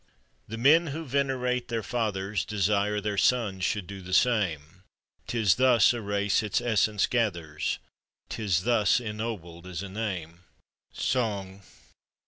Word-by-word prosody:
The 115 - -6
men 155 +8 +5
who 160 +3 -5
venerate 130 -2 -1
their 115 -2 -2
fathers, 100 -3 -2
Desire 105 0 0
their 105 -1 -2
sons 105 -7 +1
should 100 0 -1
do 100 +1 -8
the 95 +1 -2
same, 90 - +1 0.5
;Tis 110 -6 +2
thus 125 -3 +5
a 120 - -4
race 100 -1 +1
its 105 -2 0
essence 110 -3 +2
gathers, 85 -11 -1 0.5
'Tis 95 -6 -1
thus 115 -2 +3
ennobled 105 -7 -6
is 90 0 -5
a 100 - -7
name! 95 -5 -4 0.5
SONG. 100 -6 -2
105 Hz, 130 wpm, -27 LUFS, 95-120 Hz, 0.5 s, men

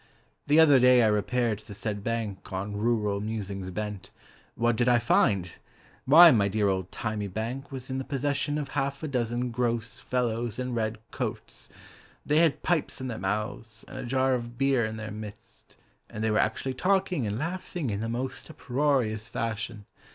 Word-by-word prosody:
The 150 +2 +5
other 145 -4 +7
day 125 -1 +6
I - - +5
repaired 110 +1 0
to - - -19
the 105 - -8
said 105 -1 -4
bank 110 -4 -3
On 100 +2 -3
rural 105 -2 0
musings 100 -3 -4
bent. 105 +1 -5 0.5
What 120 +1 +2
did 120 +2 +2
I 120 - +5
find? 100 -6 +2 0.5
Why, 165 +5 +9
my 100 -5 +3
dear 100 0 +1
old 95 -1 -1
thymy 105 -2 -3
bank 115 +8 -5
Was 130 -1 -6
in 130 - -1
the - - -3
possession 145 +1 -1
Of 145 -3 -3
half 140 +1 -2
a - - -1
dozen 120 -2 -1
gross 115 -1 -2
fellows 120 -3 -1
in 125 -1 -3
red 110 -1 -1
coats, - - -5 0.6
Thy 150 - +2
had 165 -3 +3
pipes 165 -4 0
in 130 - -5
their 115 - -4
mouths, 105 +3 -4
And - - -11
a - - -4
jar 130 +1 +1
of 120 -1 -4
beer 135 -2 +2
in 110 0 -6
their 110 -1 -6
midst, 105 -1 -11 0.3
And 105 - -5
they 110 - +2
were 105 - +2
actually 120 +4 0
talking 180 - +1
and 105 +1 -2
laughing 170 - -3
In 100 - -2
the 115 +1 -3
most 125 +6 -4
uproarious 130 -7 0
fashion. 115 -2 -4
115 Hz, 185 wpm, -28 LUFS, 105-135 Hz, 0.6 s, Why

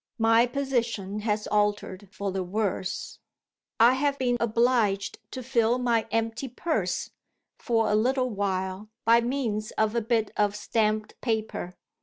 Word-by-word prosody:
My 225 +1 +4
position 235 -7 -2
has 210 0 -1
altered 205 -2 -1
for 200 -1 -3
the 190 0 -2
worse. 190 0 -3 0.6
I 235 +3 +7
have 280 +1 0
been 250 -2 +1
obliged 230 -3 +1
to 255 - -6
fill 235 -1 +2
my 240 -3 +1
empty 225 +3 -1
purse, 230 - -2 0.5
for 225 -3 +1
a 210 - +1
little 255 +3 +1
while, 190 0 -2 0.2
by 230 +1 +6
means 235 -4 -2
of 220 0 +1
a 235 - +1
bit 225 -1 0
of 205 -1 +1
stamped 215 0 -1
paper. 220 -6 -2
225 Hz, 140 wpm, -27 LUFS, 210-240 Hz, 0.6 s, I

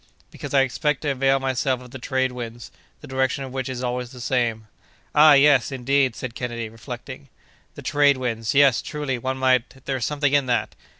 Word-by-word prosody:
"Because - - -8
I 135 - +6
expect 135 +2 0
to 150 - -1
avail 135 0 +2
myself 130 -1 0
of 125 -1 -13
the 130 - -8
trade 130 +1 -1
winds, 120 -1 -8 0.3
the - - -11
direction 130 +1 -1
of 130 - -7
which 130 -1 -3
is 130 -1 -5
always 125 0 -3
the 125 0 -12
same." 120 -3 -1 0.5
"Ah! 150 0 +7
yes, 140 -1 +5
indeed!" 135 -1 +1
said 125 -3 -6
Kennedy, 120 -2 -4
reflecting; 125 +4 -9 0.5
"the - - -10
trade 145 -1 +3
winds—yes—truly—one 130 +2 0
might—there's 130 0 0
something 145 -1 0
in 140 -2 +3
that!" 120 - -1
130 Hz, 170 wpm, -23 LUFS, 125-140 Hz, 0.5 s, Ah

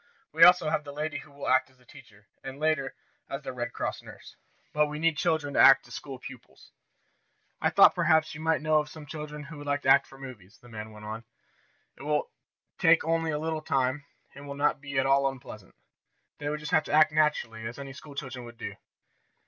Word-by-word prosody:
We 160 +2 +4
also 180 -3 +7
have 150 - 0
the 145 - -8
lady 150 +1 -4
who 150 - -14
will 140 0 -8
act 130 0 +3
as 130 - -27
the 125 - -25
teacher, 115 -7 -17 0.2
and, 135 +1 -8
later 155 -3 0 0.3
as 135 +1 -5
the - - -5
Red 120 -1 -4
Cross - - -4
nurse. - - -13 0.4
But 150 0 +3
we 150 0 -6
need 165 0 +1
children 155 -3 0
to - - +1
act 135 - +7
as - - -12
school 135 -2 -7
pupils. 130 -1 -13 0.9
"I - - +3
thought - - +7
perhaps 160 -2 +2
you 150 - -8
might 160 -1 +1
know 155 0 +3
of 150 0 -4
some 155 -1 -11
children 150 0 -7
who 150 +1 -10
would 145 - -9
like 145 0 -1
to - - +1
act - - +6
for 135 - -15
the 135 - -9
movies," 105 -7 -12
the 120 - -18
man 110 -1 -8
went 105 0 -12
on. 110 +2 -6 0.7
"It - - -14
will 150 +1 -1 0.5
take 165 0 +5
only 165 0 0
a 150 - -1
little 160 0 -3
time, 135 -1 0 0.3
and 140 +1 -11
it - - -11
will 140 - -6
not 145 0 +1
be 140 -2 -5
at 135 - +2
all 135 0 +3
unpleasant. 125 - -11 0.6
They 145 0 -3
will 150 - -2
just 150 +1 -7
have 155 - +3
to - - -6
act 155 0 +6
naturally, 135 -8 0
as 120 - -8
any 135 -1 -8
school 140 +1 -12
children 130 -3 -6
would 120 0 -12
do." 100 -4 -6
145 Hz, 235 wpm, -28 LUFS, 130-155 Hz, 0.9 s, also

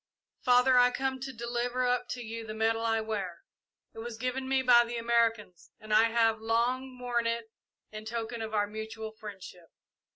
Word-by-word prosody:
"Father, 250 0 +5
I 245 0 +6
come 265 +1 -2
to 265 +1 -5
deliver 240 +1 -2
up 250 0 0
to 245 - -4
you 230 0 -6
the 215 -1 -7
medal 225 +1 +1
I 225 -1 +1
wear. 200 -6 -4 0.5
It - - -10
was 230 0 -6
given 255 +2 -3
me 265 0 +2
by 240 -1 +7
the 235 0 -5
Americans, 230 -5 0
and 215 0 -5
I 220 +1 +6
have 225 -1 +2
long 250 +3 0
worn 240 -2 -1
it 230 -1 -3 0.4
in 215 0 -8
token 230 +1 -4
of 220 -1 -4
our 205 -1 +3
mutual 220 +1 -6
friendship. 195 -5 -11
230 Hz, 185 wpm, -30 LUFS, 220-245 Hz, 0.5 s, by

